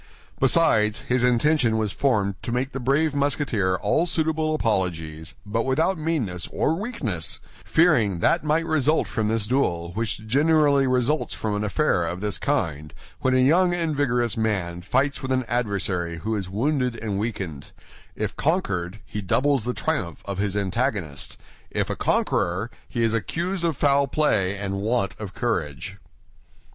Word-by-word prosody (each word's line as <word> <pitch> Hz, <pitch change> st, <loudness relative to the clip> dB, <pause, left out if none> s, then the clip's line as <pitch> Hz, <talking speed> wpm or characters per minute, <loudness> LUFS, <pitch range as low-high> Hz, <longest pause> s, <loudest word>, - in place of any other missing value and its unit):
Besides, 120 Hz, -7 st, +4 dB
his 125 Hz, 0 st, 0 dB
intention 125 Hz, -1 st, +3 dB
was 110 Hz, -2 st, -1 dB
formed 105 Hz, -8 st, +1 dB
to -, -, -4 dB
make 125 Hz, +3 st, -1 dB
the 135 Hz, -, -4 dB
brave 140 Hz, +4 st, +1 dB
Musketeer 140 Hz, -9 st, +1 dB
all 105 Hz, -, +1 dB
suitable 160 Hz, -1 st, 0 dB
apologies, 85 Hz, -, -2 dB
but 110 Hz, +3 st, -1 dB
without 160 Hz, +9 st, +1 dB
meanness 145 Hz, -, -2 dB
or 155 Hz, -, +1 dB
weakness, 160 Hz, -, -2 dB, 0.3 s
fearing 115 Hz, -, +3 dB
that 165 Hz, -, +2 dB
might 155 Hz, +2 st, +1 dB
result 155 Hz, -1 st, +2 dB
from 110 Hz, -3 st, -1 dB
this 110 Hz, -1 st, +1 dB
duel 90 Hz, -9 st, 0 dB
which 110 Hz, +1 st, -3 dB
generally 145 Hz, +2 st, +3 dB
results 130 Hz, +4 st, +1 dB
from 110 Hz, -1 st, -2 dB
an 105 Hz, -, -1 dB
affair 105 Hz, -, +1 dB
of 85 Hz, +2 st, -3 dB
this 105 Hz, 0 st, -2 dB
kind, 75 Hz, -2 st, -2 dB, 0.2 s
when 130 Hz, 0 st, +1 dB
a 130 Hz, -, +4 dB
young 175 Hz, +7 st, +4 dB
and 165 Hz, -3 st, -1 dB
vigorous 125 Hz, -5 st, +1 dB
man 95 Hz, -6 st, -1 dB
fights 135 Hz, +10 st, 0 dB
with 130 Hz, -1 st, -4 dB
an 130 Hz, -1 st, +1 dB
adversary 100 Hz, -7 st, -1 dB
who 110 Hz, +5 st, -2 dB
is 95 Hz, -3 st, -4 dB
wounded 125 Hz, +4 st, 0 dB
and 105 Hz, -4 st, -3 dB
weakened—if 95 Hz, -10 st, -6 dB
conquered, 100 Hz, -, -1 dB
he 105 Hz, -, -5 dB
doubles 130 Hz, +5 st, +1 dB
the 125 Hz, -, -1 dB
triumph 90 Hz, -, -2 dB
of 100 Hz, -1 st, -4 dB
his 100 Hz, 0 st, -1 dB
antagonist; 100 Hz, -, -2 dB, 0.3 s
if -, -, -1 dB
a -, -, -2 dB
conqueror, 95 Hz, +7 st, 0 dB, 0.2 s
he 120 Hz, -, -2 dB
is 115 Hz, -1 st, +2 dB
accused 170 Hz, -, -2 dB
of 165 Hz, -5 st, 0 dB
foul 140 Hz, -1 st, +3 dB
play 105 Hz, -10 st, +1 dB
and 100 Hz, 0 st, -3 dB
want 110 Hz, -2 st, 0 dB
of 100 Hz, -3 st, -7 dB
courage. 95 Hz, -, -2 dB
115 Hz, 155 wpm, -24 LUFS, 100-145 Hz, 0.3 s, Besides